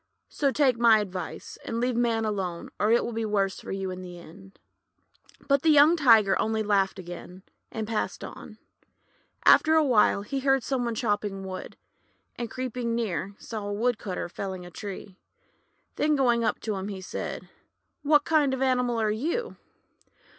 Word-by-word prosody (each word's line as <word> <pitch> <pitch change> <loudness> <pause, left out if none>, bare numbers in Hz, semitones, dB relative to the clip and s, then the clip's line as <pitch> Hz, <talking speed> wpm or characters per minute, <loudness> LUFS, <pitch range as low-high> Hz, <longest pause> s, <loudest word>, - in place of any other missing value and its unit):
"So 280 - 0
take 260 -4 +2
my 230 -2 +6
advice, 185 -5 -5
and 230 - -3
leave 245 0 0
Man 230 -2 +1
alone, 190 -5 -3
or 210 - +2
it 235 - +3
will 235 - -4
be 225 0 -2
worse 200 -3 0
for - - -8
you 195 -1 -3
in 185 0 -7
the 180 -1 -9
end." 190 +3 -14 0.9
But 280 -1 +3
the 320 - +3
young 300 +2 +7
Tiger 225 - +5
only 220 0 0
laughed 200 -2 +1
again, 180 +1 -9 0.3
and 220 -2 -4
passed 220 -1 -3
on. - - -10 0.9
After 315 0 +6
a 315 - +5
while, 215 -6 +3
he 275 +6 -3
heard 270 -1 +2
some 255 -1 -1
one 235 -1 -2
chopping 205 -3 -2
wood, 185 -1 -7 0.6
and 235 -2 -5
creeping 250 -2 -3
near, 200 -3 -3
saw 215 -3 -6
a 205 - -3
Woodcutter 215 -5 -2
felling 185 0 -6
a 175 - -11
tree. 195 +1 -8 0.8
Then 305 0 +2
going 240 -4 +2
up 220 - 0
to 215 - -2
him, 190 +1 -4
he 195 -2 -6
said: 185 - -6 0.3
— - - -52
'What 295 0 +4
kind 295 -4 +2
of 260 - -6
an - - +3
animal 250 -2 +1
are 215 -1 +1
you?' 335 - -2
220 Hz, 180 wpm, -27 LUFS, 195-255 Hz, 0.9 s, young